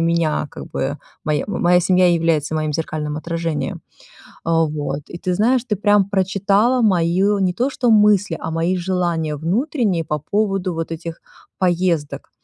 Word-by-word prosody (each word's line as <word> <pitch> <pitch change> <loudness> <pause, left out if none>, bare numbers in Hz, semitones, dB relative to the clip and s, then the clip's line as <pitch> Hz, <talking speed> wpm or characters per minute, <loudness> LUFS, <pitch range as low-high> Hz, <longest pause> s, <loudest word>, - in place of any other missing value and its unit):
меня, 165 -2 +1
как - - -9
бы. 140 +3 -3 0.3
Моя 150 -2 0
моя 180 -2 +2
семья 180 0 +3
является 160 -3 +1
моим 155 -1 -1
зеркальным 150 -1 -3
отражением. 165 -1 -3 0.6
Вот. 155 -3 0
И, - - -7
ты 180 - -1
знаешь, 235 +5 +2
ты 215 - -1
прям 205 0 +3
прочитала 200 +5 +2
мои 180 -5 +2 0.2
не 185 -1 +1
то 245 +8 0
что 245 -3 +1
мысли, 205 -4 +4
а 160 - -4
мои 165 +3 0
желания 170 -4 -1
внутренние 195 - 0
по 150 0 -1
поводу 195 +2 -1
вот 165 0 -4
этих 165 0 -6 0.4
поездок. 175 -4 0
175 Hz, 150 wpm, -20 LUFS, 160-195 Hz, 0.6 s, мысли